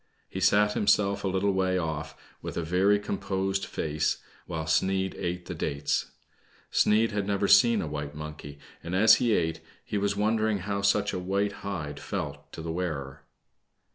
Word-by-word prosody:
He 95 - -6
sat 105 +2 +4
himself 100 -1 +2
a - - 0
little 95 +1 +1
way 95 -1 +1
off, 80 -4 -3 0.2
with - - -6
a 85 - -1
very 95 +5 +3
composed 95 -1 -2
face, 75 -1 -1 0.3
while 80 -2 -3
Sneid 95 +4 +1
eat 90 0 -4
the 90 - -5
dat^. 70 -4 -1 0.7
Sneid 110 +2 +3
had 105 -2 -2
never 100 0 +1
seen 115 -1 +6
a - - -4
white 75 -1 -5
monkey, 75 -2 -8 0.3
and, 85 +2 -3
as 110 +4 +7
he 120 -4 +2
eat, 80 -1 -1 0.3
he 105 - -2
was 100 0 0
wondering 110 0 +1
how 100 -1 -1
such 100 +1 +2
a 90 - -2
white 100 +3 0
hide 75 -8 -4
felt - - -5
to 80 - -8
the 80 - -3
wearer. 75 -6 -4
95 Hz, 170 wpm, -28 LUFS, 80-100 Hz, 0.7 s, as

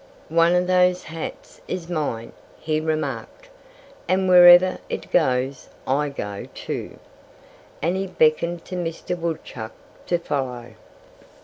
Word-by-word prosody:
"One 165 +2 +4
of 180 0 +2
those 180 0 +3
hats 165 0 -8
is 175 -2 -4
mine," 145 -9 -3 0.3
he 155 -1 -1
remarked. 160 - -4 0.6
"And 185 +1 +1
wherever 180 0 +8
it - - -5
goes, 130 -4 +1 0.2
I 145 +3 +1
go, 105 -7 -6
too," - - -6 0.9
And 170 +3 +1
he 195 0 -2
beckoned 170 0 +1
to 185 - -6
Mr. 175 0 -3
Woodchuck 160 -9 -5 0.3
to 175 - +2
follow. 125 -7 -4
165 Hz, 120 wpm, -23 LUFS, 140-180 Hz, 0.9 s, wherever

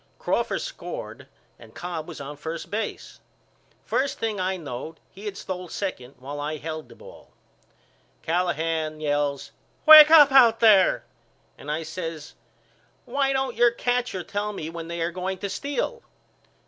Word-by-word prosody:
Crawford - - -1
scored - - -7 0.3
and 110 -1 -16
Cobb 165 -1 -5
was 170 - -9
on 140 +1 -7
first 160 +3 -7
base. 220 +2 -5 0.7
First 275 +1 -1
thing 220 -3 -2
I 185 +1 -1
knowed 155 0 -7
he 200 +3 -12
had 200 -2 -5
stole 185 -2 -6
second 145 -9 -5
while 140 +3 -7
I 150 +1 -3
held 155 +1 -7
the - - -14
ball. - - -15 0.9
Callahan 160 -2 -1
yells 145 -2 -1 0.3
Wake 310 -1 +11
up 300 -3 +8
out 240 -4 +6
there 205 -5 +5 0.5
and 145 - -11
I 155 +2 -2
says 160 -1 -7 0.7
Why 275 -1 0
don't 265 -2 -1
your 240 0 +5
catcher 245 -5 -2
tell 205 +2 -3
me 160 -5 -6
when 165 -1 -7
they 170 0 -5
are 165 +1 -1
going 185 +2 -4
to 200 - -5
steal. 285 - -3
180 Hz, 150 wpm, -25 LUFS, 155-225 Hz, 0.9 s, Wake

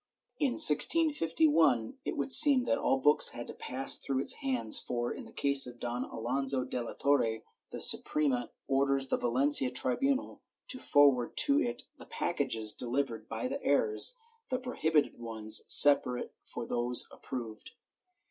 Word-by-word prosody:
In 280 -5 -1
1651, 160 - +4
it - - -5
would - - -4
seem 280 -2 +6
that 280 +3 -2
all 135 - -1
books 145 +3 +3
had 120 - -10
to - - -11
pass 130 +1 -3
through 135 - -5
its - - +1
hands 120 -5 0
for, 120 -1 -5
in - - -11
the - - -16
case 140 -2 +2
of 120 -1 -13
Don 120 +1 -5
Alonso 130 +3 -4
de 125 -1 -6
la 120 - -8
Torre, 115 -6 -2 0.3
the - - -9
Suprema 135 -5 0 0.2
orders 135 0 -1
the - - -1
Valencia 130 +2 +2
tribunal 260 - -3 0.3
to 255 - -4
forward 140 - +1
to 285 +1 +4
it 240 0 -5 0.2
the - - -15
packages 115 -10 -2
delivered 120 -3 -5
by - - -5
the 275 +2 -7
heirs, 455 +3 +1 0.3
the 255 - -2
prohibited 160 - -3
ones 110 -2 +1
separate 135 -4 +4
from 120 - -9
those 120 0 0
approved.' 115 -4 -10
135 Hz, 155 wpm, -29 LUFS, 120-160 Hz, 0.3 s, seem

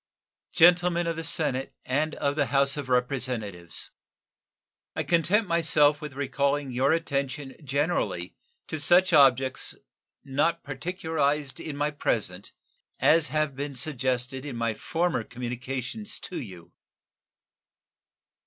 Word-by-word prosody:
Gentlemen 175 0 +5
of 165 0 -1
the 165 - -4
Senate 150 -4 0
and 150 +4 0
of 140 0 -1
the 145 -3 +1
House 140 -1 +3
of 145 -3 -5
Representatives: 125 - -2 1.0
I - - -1
content 180 +5 +2
myself 150 -3 +3
with 150 -3 -6
recalling 140 0 -1
your 130 +4 +2
attention 140 -4 -2
generally 140 - -1 0.3
to 155 - -5
such 175 +4 +4
objects, 135 -3 +4 0.5
not 150 +5 0
particularized 150 -2 -2
in 150 -3 -6
my 150 +1 0
present, 100 -9 -2 0.5
as 160 -1 +4
have 155 -3 -1
been 140 0 -4
suggested 130 -1 -1
in 145 -4 -6
my 115 -1 -1
former 165 +2 -1
communications 125 - -4
to 185 - -5
you. 90 -8 -11
140 Hz, 115 wpm, -27 LUFS, 130-160 Hz, 1.0 s, Gentlemen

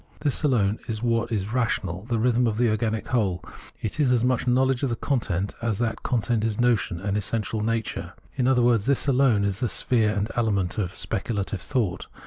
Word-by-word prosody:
This 145 -3 -1
alone 110 -8 +2
is 110 0 -4
what 115 0 0
is 105 0 -2
rational, 100 -7 -1
the 120 -1 -1
rhythm 120 +1 +2
of 110 -2 -1
the 120 0 +3
organic 110 0 -1
whole: 95 -8 0 0.4
it 110 +7 -3
is 140 -4 +3
as 120 -2 +2
much 125 0 +1
know 125 +1 +4
ledge 130 -2 +1
of 120 -4 -1
content 100 -8 -1
as 115 -4 -1
that 115 0 -2
content 120 -2 0
is 110 -1 -1
notion 115 -7 +1
and 100 +2 -2
essential 105 +1 -1
nature. 115 0 -2 0.2
In 125 -2 0
other 125 -2 +3
words, 120 -2 +3
this 140 0 +1
alone 125 -6 +3
is 100 0 -1
the 120 -2 0
sphere 115 -2 +2
and 105 +1 -1
element 105 -4 0
of 95 -3 -3
speculative 100 -1 -2
thought. 105 -9 -2
115 Hz, 200 wpm, -25 LUFS, 105-125 Hz, 0.4 s, know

